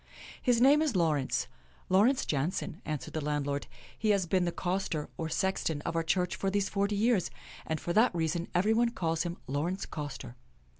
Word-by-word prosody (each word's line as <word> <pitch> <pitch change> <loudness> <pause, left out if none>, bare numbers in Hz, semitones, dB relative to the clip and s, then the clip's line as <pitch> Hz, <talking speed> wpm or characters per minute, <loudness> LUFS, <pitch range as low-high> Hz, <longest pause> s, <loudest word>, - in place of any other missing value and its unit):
" - - -15
His 235 - +3
name 280 +5 +6
is 300 -8 0
Laurence 135 -7 +1 0.2
— - - -31
Laurence 215 +9 +4
Jaonssen," 150 +6 -2
an 155 -1 -1
swered - - -10
the 155 - -2
landlord. 145 -1 -1 0.2
" - - -22
He 220 - +1
has 200 -3 +3
been 180 +1 +1
the 175 - 0
coster, 180 -4 -2
or 160 -1 -3
sexton, 160 -4 0
of 165 - -3
our 165 - +2
church 180 +3 0
for 195 - -1
these 200 0 0
forty 200 0 0
years, 210 -3 +2 0.4
and 160 -1 -1
for 170 - -3
that 220 -1 +4
reason 170 +1 -1
everybody 220 +6 +3
calls 165 -7 -1
him 175 -1 -3
Laurence 160 +8 -2
Coster." 145 -5 -6
175 Hz, 200 wpm, -30 LUFS, 155-200 Hz, 0.4 s, name